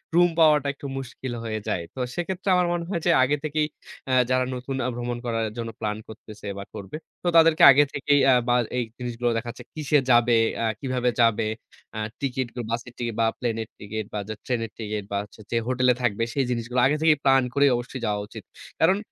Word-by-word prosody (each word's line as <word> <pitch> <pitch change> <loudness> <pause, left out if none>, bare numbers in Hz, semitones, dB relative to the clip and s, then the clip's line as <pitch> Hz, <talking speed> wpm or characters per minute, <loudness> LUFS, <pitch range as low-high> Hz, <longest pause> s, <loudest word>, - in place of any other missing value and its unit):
Room 175 0 +6
পাওয়াটা 150 -3 +5
একটু 140 - -12
মুশকিল 130 -1 -6
হয়ে 110 -1 -3
যায়। 85 - -1
তো, - - -7 0.2
সেক্ষেত্রে 185 +2 -3
আমার 180 -1 +3
মনে 170 -1 -2
হয় 170 -4 -2
যে 175 - +5
আগে 145 +3 +1
থেকেই 155 0 0 0.4
আ - - +2 0.2
যারা 130 0 +2
নতুন 125 +2 -5
আ - - 0
ভ্রমণ 120 0 -3
করার 115 -1 -1
জন্য 115 -1 -3
প্ল্যান 105 -1 -2
করতেছে 110 -1 -11
বা, 100 - -5
করবে, 100 +8 -7 0.3
তো - - -2
তাদেরকে 165 +1 +5
আগে 145 +2 +6
থেকেই 145 0 +2
আ - - +6
বা 120 - +3 0.2
এই 125 - +1 0.2
জিনিসগুলো 120 -1 -2
দেখা 120 +1 -4
যাচ্ছে 120 - -12
কিসে 150 -1 +2
যাবে, 120 0 +5 0.3
আ - - +1
কিভাবে 125 -2 0
যাবে, 115 -1 +3 0.5
আ - - -2 0.2
টিকেট, 130 -2 -1
গা 125 - -3
বাসের 115 +1 -4
টিকেট 120 -2 -3
বা, - - +4
প্লেনের 115 -2 -2
টিকেট 110 +1 -5
বা, 105 - -2
যে 110 - -2
ট্রেনের 115 -3 -2
টিকেট 105 -1 -3
বা, 100 - 0
যে 105 - -4
হচ্ছে 110 - -16
যে 115 - +1
হোটেলে 125 0 +3
থাকবে, 115 -2 0
সেই 135 -2 +1
জিনিসগুলো 120 +1 -1
আগে 140 +3 +3
থেকেই 160 -1 +5
প্ল্যান 135 -1 +5
করে 140 +1 +4
অবশ্যই 125 +1 -5
যাওয়া 105 -1 0
উচিত। - - -10 0.4
কারণ, 185 +4 +4
125 Hz, 215 wpm, -25 LUFS, 115-145 Hz, 0.5 s, Room